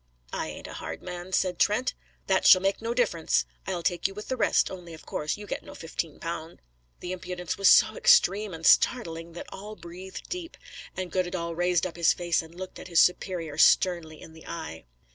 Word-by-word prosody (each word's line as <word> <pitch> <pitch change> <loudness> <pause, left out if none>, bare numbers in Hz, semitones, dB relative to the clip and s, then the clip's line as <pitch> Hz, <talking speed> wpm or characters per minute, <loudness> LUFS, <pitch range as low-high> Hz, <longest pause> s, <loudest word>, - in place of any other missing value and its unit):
"I - - -2
ain't - - -8
a - - -8
hard 80 - -7
man," 180 0 -7
said 180 -2 0
Trent. 220 +5 +2 0.3
"That 190 -1 +2
shall 185 - +9
make 195 +3 0
no 230 +1 -2
difference. 165 - +1 0.2
I'll 170 - -2
take 175 0 +1
you 195 - -10
with 210 - -8
the 260 - 0
rest, 240 - +2
only 175 -3 -9
of 155 - -15
course 150 0 -3
you 210 - -9
get - - -4
no - - -12
fifteen 165 -1 -5
pound." 165 0 -6 0.4
The 180 - -5
impudence 180 -1 -4
was 195 -1 +5
so - - +6
extreme 475 - +4
and 165 -1 -7
startling, 165 -8 +3
that 170 - -7
all 210 +2 -8
breathed 185 +1 -10
deep, 355 -2 -6 0.4
and 185 -2 -4
Goddedaal 175 -2 -2
raised 175 0 +1
up 175 -2 -6
his 170 - +4
face 175 -2 0
and 165 +1 -14
looked 185 +1 -8
his 170 -2 +1
superior 170 -4 +1
sternly 170 -4 +3
in 160 - -12
the 160 - -14
eye. 160 - -7
180 Hz, 200 wpm, -27 LUFS, 165-195 Hz, 0.4 s, shall